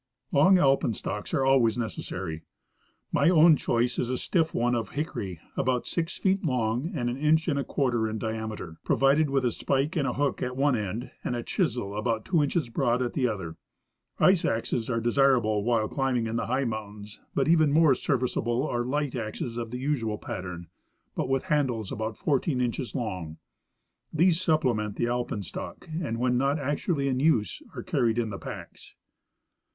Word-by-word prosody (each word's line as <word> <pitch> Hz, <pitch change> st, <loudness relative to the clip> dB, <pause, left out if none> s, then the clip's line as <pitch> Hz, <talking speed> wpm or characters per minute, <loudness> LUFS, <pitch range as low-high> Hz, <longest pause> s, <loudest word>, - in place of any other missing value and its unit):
Long 185 Hz, +7 st, +6 dB
alpenstocks 120 Hz, -, 0 dB
are 135 Hz, -, +1 dB
always 125 Hz, -5 st, +4 dB
necessary. 95 Hz, -8 st, -4 dB, 0.7 s
My 145 Hz, +3 st, +4 dB
own 165 Hz, -2 st, +7 dB
choice 120 Hz, -2 st, 0 dB
is 125 Hz, -, -1 dB
a 130 Hz, -, 0 dB
stiff 160 Hz, +2 st, +1 dB
one 120 Hz, +1 st, +1 dB
of 115 Hz, -4 st, -1 dB
hickory, 100 Hz, -, -4 dB, 0.2 s
about 125 Hz, 0 st, 0 dB
six 170 Hz, 0 st, -2 dB
feet 195 Hz, 0 st, +1 dB
long 125 Hz, 0 st, 0 dB
and 120 Hz, -5 st, -1 dB
an 120 Hz, +1 st, -2 dB
inch 155 Hz, +2 st, +2 dB
and 145 Hz, -4 st, +1 dB
a -, -, 0 dB
cpiarter 120 Hz, -7 st, 0 dB
in 110 Hz, -, -3 dB
diameter, 110 Hz, -6 st, -5 dB
provided 140 Hz, +3 st, +3 dB
with 135 Hz, -1 st, +1 dB
a 120 Hz, -, +2 dB
spike 140 Hz, +8 st, -1 dB
and 145 Hz, -4 st, +1 dB
hook 145 Hz, +1 st, -1 dB
at 125 Hz, 0 st, -3 dB
one 140 Hz, -1 st, +3 dB
end 105 Hz, +2 st, -4 dB
and 125 Hz, -, -2 dB
a 120 Hz, -, -3 dB
chisel 100 Hz, -2 st, -1 dB
about 110 Hz, 0 st, -1 dB
tAvo 175 Hz, -4 st, +2 dB
inches 145 Hz, -1 st, -1 dB
broad 120 Hz, 0 st, +1 dB
at 120 Hz, -, -3 dB
the 130 Hz, -3 st, +1 dB
other. 95 Hz, -8 st, -4 dB, 0.6 s
Ice 185 Hz, -2 st, +4 dB
axes 115 Hz, +1 st, -1 dB
are 115 Hz, -2 st, +1 dB
desir 135 Hz, +3 st, +4 dB
able 110 Hz, -3 st, 0 dB
while 115 Hz, -1 st, +2 dB
climbing 130 Hz, -3 st, 0 dB
in 115 Hz, 0 st, -3 dB
the 115 Hz, -, -1 dB
high 130 Hz, +3 st, 0 dB
mountains, 105 Hz, -2 st, -6 dB
but 135 Hz, -, +2 dB
even 160 Hz, -3 st, +4 dB
more 155 Hz, -1 st, +5 dB
ser 130 Hz, +2 st, 0 dB
viceable 125 Hz, +1 st, -1 dB
are 120 Hz, 0 st, -1 dB
light 145 Hz, +2 st, -1 dB
axes 115 Hz, 0 st, -4 dB
of 115 Hz, -1 st, -4 dB
the 125 Hz, -, -5 dB
usual 125 Hz, -6 st, -1 dB
i^attern, 90 Hz, -3 st, -6 dB, 0.5 s
but -, -, -2 dB
with 135 Hz, -1 st, +1 dB
handles 125 Hz, -9 st, 0 dB
about 110 Hz, 0 st, -3 dB
fourteen 140 Hz, -1 st, 0 dB
inches 125 Hz, +1 st, -2 dB
long; 90 Hz, -, -4 dB, 0.7 s
these 165 Hz, +1 st, +3 dB
sujDplement 125 Hz, -, +1 dB
the -, -, 0 dB
alpenstock, 120 Hz, -6 st, -4 dB, 0.2 s
and 115 Hz, -5 st, -2 dB
when 125 Hz, +1 st, +1 dB
not 140 Hz, +3 st, +2 dB
actually 145 Hz, +1 st, -1 dB
in 130 Hz, -1 st, 0 dB
use 130 Hz, -, +2 dB
are -, -, -5 dB
carried 115 Hz, -1 st, +1 dB
in 115 Hz, -3 st, 0 dB
the 100 Hz, -, -6 dB
packs. -, -, -9 dB
125 Hz, 180 wpm, -27 LUFS, 110-140 Hz, 0.7 s, own